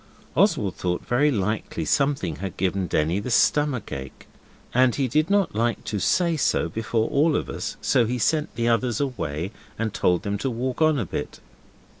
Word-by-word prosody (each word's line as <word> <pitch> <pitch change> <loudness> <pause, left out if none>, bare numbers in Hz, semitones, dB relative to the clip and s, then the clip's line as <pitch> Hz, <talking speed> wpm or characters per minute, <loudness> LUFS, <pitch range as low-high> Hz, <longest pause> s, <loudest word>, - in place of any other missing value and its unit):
Oswald - - +2
thought 90 -1 -2
very 135 +5 +3
likely 105 - -2
something 140 - +1
had 95 -2 -6
given 95 0 0
Denny 80 +4 +1
the 110 - -5
stomach 130 -2 +2
ache, 65 -1 -7 0.5
and 125 -1 +4
he 135 -2 0
did 155 +7 +1
not 200 -2 +2
like 115 +2 0
to 105 - -3
say 170 - +2
so 140 - +1
before 110 0 -1
all 150 +2 +3
of - - -1
us, - - -5
so 120 -3 +3
he 125 +2 -1
sent 150 +8 0
the 115 0 0
others 120 -1 +1
away 90 - -3 0.3
and 110 -2 -2
told 90 +1 +1
them 100 -1 -2
to 135 - -1
walk 125 +4 -3
on 155 -1 +4
a 115 - -1
bit. - - -5
115 Hz, 185 wpm, -24 LUFS, 100-140 Hz, 0.5 s, and